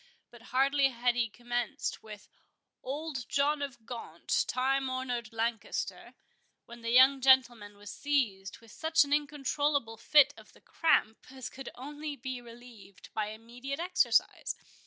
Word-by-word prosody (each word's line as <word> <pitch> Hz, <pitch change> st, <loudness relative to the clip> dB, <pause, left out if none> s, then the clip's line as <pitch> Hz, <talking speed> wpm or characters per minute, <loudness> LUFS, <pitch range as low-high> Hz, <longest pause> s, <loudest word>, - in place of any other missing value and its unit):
But 240 Hz, -1 st, -15 dB
hardly 275 Hz, +2 st, +3 dB
had 245 Hz, -1 st, +1 dB
he 235 Hz, -2 st, +1 dB
commenced 240 Hz, +1 st, -3 dB
with 210 Hz, -2 st, -11 dB, 0.5 s
"Old 280 Hz, -1 st, -5 dB
John 285 Hz, +1 st, +1 dB
of 270 Hz, -5 st, -6 dB
Gaunt, 235 Hz, 0 st, -2 dB
time 265 Hz, +1 st, 0 dB
honored 250 Hz, -3 st, -3 dB
Lancaster," 225 Hz, -1 st, -3 dB, 0.5 s
when 235 Hz, 0 st, -12 dB
the 230 Hz, -, -3 dB
young 260 Hz, +3 st, +6 dB
gentleman 240 Hz, -6 st, +4 dB
was 205 Hz, 0 st, -9 dB
seized 225 Hz, -10 st, -1 dB
with 230 Hz, -2 st, -16 dB
such 320 Hz, +3 st, +3 dB
an 285 Hz, 0 st, -2 dB
incontrollable 290 Hz, -4 st, 0 dB
fit 290 Hz, +3 st, +5 dB
of -, -, -16 dB
the -, -, -21 dB
cramp 225 Hz, -9 st, +1 dB
as 260 Hz, -1 st, -8 dB
could 270 Hz, -1 st, -8 dB
only 295 Hz, +3 st, -6 dB
be 260 Hz, -1 st, -6 dB
relieved 230 Hz, -6 st, -14 dB
by 215 Hz, -1 st, -1 dB
immediate 240 Hz, +6 st, -7 dB
exercise. 360 Hz, +1 st, +1 dB
255 Hz, 140 wpm, -31 LUFS, 230-280 Hz, 0.5 s, young